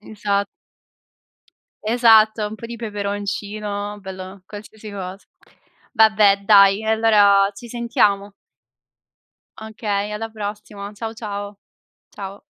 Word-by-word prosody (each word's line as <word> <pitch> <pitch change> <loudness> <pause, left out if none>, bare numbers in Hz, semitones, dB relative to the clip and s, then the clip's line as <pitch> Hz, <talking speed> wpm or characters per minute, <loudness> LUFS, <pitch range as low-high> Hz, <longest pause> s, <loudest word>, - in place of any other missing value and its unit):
Esa 205 -1 -2 1.4
Esatto, 220 -2 +4
un 210 - -8
po' 230 - -9
di 235 0 -7
peperoncino, 205 -1 -4
bello, 190 0 -9
qualsiasi 215 +1 -11
cosa. 190 -1 -6 0.8
Vabbè, 215 -3 +5
dai, 200 0 +6
e - - -8
allora 205 -3 +4
ci 235 +4 -11
sentiamo. 210 -4 0 1.3
Okay, 210 -2 -3
alla 220 +2 -4
prossima. 205 -1 -7
Ciao, 225 +1 -6
ciao. 205 -2 -6 0.5
Ciao. 200 0 -9
210 Hz, 100 wpm, -21 LUFS, 200-220 Hz, 1.4 s, dai